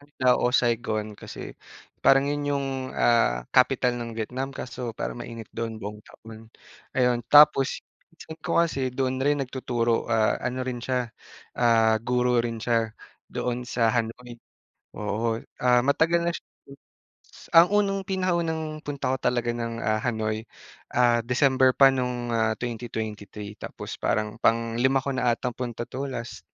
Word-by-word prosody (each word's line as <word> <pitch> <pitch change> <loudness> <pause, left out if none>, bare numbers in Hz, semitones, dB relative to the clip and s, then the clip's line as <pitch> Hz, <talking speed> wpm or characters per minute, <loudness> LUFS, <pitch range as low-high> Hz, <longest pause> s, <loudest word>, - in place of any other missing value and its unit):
nagda 145 -3 0
o 125 - +2
Saigon 110 -3 0
kasi - - -9 0.5
parang 135 0 +5
yun 145 0 -2
yung, 140 -1 -1 0.3
ah, - - +2
capital 125 -1 +3
ng 115 -1 -5
Vietnam. 130 +5 -3
Kaso 125 -2 -6
parang - - -4
mainit 115 -2 -8
doon 115 -1 -4
buong 105 +1 -7
taon, 110 0 -14 0.5
ayon. 125 -2 +3
Tapos 145 -2 +6 0.3
pinsan 160 -1 -11
ko - - +2
kasi 135 -6 -1
doon 130 0 -1
rin 145 0 +2
nagtuturo, 120 -3 -1
ah, 110 -1 +3
ano 125 +1 -2
rin 125 -2 -3
siya, 125 -2 -1 0.5
ah, 115 -2 +4
guro 125 0 +1
rin 115 -1 -3
siya 115 -1 0 0.4
doon 125 0 -2
sa 120 -2 +1
Hanoi. 120 +1 -3 0.6
Oo, 110 +2 -1 0.2
ah, 125 -1 +4
matagal 160 +5 +2
na 170 - +1
siya - - -7
hmm. - - - 1.0
Ang 165 +2 +8
unang 200 -1 +2
pinakaunang 165 -5 -1
punta 140 -3 -2
ko - - -1
talaga 120 -1 0
ng, 115 -1 -4
ah, 110 0 +1
Hanoi, 110 -2 -1 0.5
ah 120 -1 +4
December 130 +1 +3
pa 135 - +8
nung, 125 -2 -2
ah, 110 -1 +2
2023. 110 -3 -5
Tapos - - -7
parang 105 +1 -1
panglima 115 +3 +2
ko 140 - -1
na 125 -2 +2
atang 125 0 -3
punta 120 -2 -4
‘to 135 +2 -4
last, 120 -2 -6
120 Hz, 150 wpm, -26 LUFS, 115-135 Hz, 1.0 s, Ang